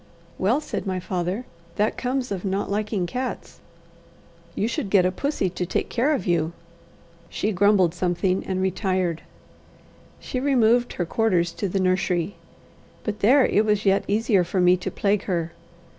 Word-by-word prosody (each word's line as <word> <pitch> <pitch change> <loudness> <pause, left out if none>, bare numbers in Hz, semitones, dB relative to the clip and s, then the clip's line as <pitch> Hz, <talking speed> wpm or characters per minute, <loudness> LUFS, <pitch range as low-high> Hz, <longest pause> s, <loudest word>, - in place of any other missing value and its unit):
"Well," 235 +10 +2
said 255 - -5
my 185 -1 -1
father, 185 +5 -3 0.3
"that 210 +1 +1
comes 255 -1 -2
of 190 -3 -3
not 195 0 -2
liking 210 -2 -1
cats. 250 +8 -5 1.0
You 210 - 0
should 230 -3 -3
get 190 -2 +4
a 185 - +2
pussy 280 -1 -1
to 180 - -3
take 180 - -2
care 275 +6 +1
of 185 - -4
you." 170 -2 +1 0.8
She 215 - -1
grumbled 195 -3 +3
something 180 +1 0
and 185 0 -1
retired. 185 -3 -1 1.0
She 255 - -4
removed 245 -3 +3
her 175 - -2
quarters 175 -3 +1
to 190 +3 -3
the 195 - -1
nursery. 185 -1 0 0.7
But 210 -1 -3
there 260 +6 +5
it 210 - +3
was 210 -1 0
yet 195 0 +3
easier 210 -2 +2
for 185 +2 -2
me 180 0 +5
to 180 - -4
plague 200 0 0
her. 170 -3 -1
195 Hz, 160 wpm, -24 LUFS, 180-220 Hz, 1.0 s, there